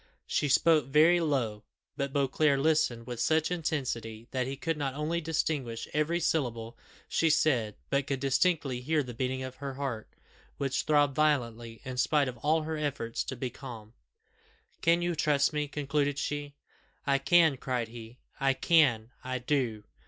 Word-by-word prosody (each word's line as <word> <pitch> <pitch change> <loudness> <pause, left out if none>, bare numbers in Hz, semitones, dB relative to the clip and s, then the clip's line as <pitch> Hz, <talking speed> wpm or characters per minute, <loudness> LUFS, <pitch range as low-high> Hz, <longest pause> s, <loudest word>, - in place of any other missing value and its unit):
She 145 - 0
spoke 155 0 +4
very 155 +5 +5
low: 125 -10 -1 0.3
but 140 0 -2
Beauclerc 140 +1 +2
listened 145 -6 +1
with 120 -1 -6
such 160 +6 +2
intensity 120 -9 -3
that 130 -1 -1
he 135 +1 -4
could 165 +3 -1
not 140 -3 -3
only 160 +3 -1
distinguish 145 -7 -2
every 155 +3 +1
syllable 120 -9 -1 0.3
she 165 - +2
said, 125 -9 +2 0.2
but 140 0 +1
could 135 -2 -1
distinctly 140 -2 +1
hear 150 +3 +1
the 125 -2 -8
beating 130 +2 -2
of 130 0 -7
her 140 -1 -5
heart, 130 -6 -4 0.5
which 135 -1 -1
throbbed 145 -2 +3
violently, 120 -7 0
in 130 -1 -5
spite 145 +2 +2
of 125 -1 -5
all 155 +5 +2
her 160 0 -3
efforts 140 -6 -2
to 130 - -4
be 125 0 -4
calm. 115 -4 -10 0.9
"Can 170 +1 +3
you 175 0 0
trust 150 -2 +2
me?" 150 -1 -1
concluded 145 0 -1
she. 145 -1 -3 0.5
"I 140 -1 +2
can," 160 +1 +4
cried 125 -3 -2
he. 115 +1 -10 0.2
"I 135 0 +3
can 130 -9 +3
I 130 0 -2
do! 125 -5 -1
140 Hz, 165 wpm, -29 LUFS, 125-150 Hz, 0.9 s, very